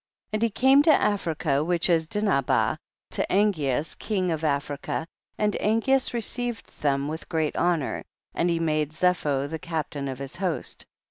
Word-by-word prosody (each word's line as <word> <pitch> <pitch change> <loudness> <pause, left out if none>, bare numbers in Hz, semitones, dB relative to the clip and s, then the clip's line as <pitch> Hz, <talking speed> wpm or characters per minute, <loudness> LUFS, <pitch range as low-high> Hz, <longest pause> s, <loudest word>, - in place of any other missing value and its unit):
2. - - -36
And - - -6
he 230 - +3
came 265 +6 +5
to 305 - +3
Africa, 160 -7 0
which 175 +1 +1
is 165 -3 +2
Dinhabah, 200 -11 +1 0.3
to - - -1
Angeas 155 -8 +1
king 190 -4 -1
of 160 -1 -2
Af 140 -2 +1
rica, 145 +2 -3 0.3
and 210 -1 +1
Angeas 240 +5 +2
received 240 -1 -4
them 140 -1 +1
with 160 +2 -6
great 160 -2 0
honor, 170 -6 0 0.3
and 175 - +1
he 170 -1 +1
made 155 -2 0
Zepho 155 -5 +1
the 160 +2 -5
captain 150 -4 -3
of 130 -1 -4
his 140 +4 -6
host. 185 -4 -3
165 Hz, 165 wpm, -26 LUFS, 150-205 Hz, 0.3 s, came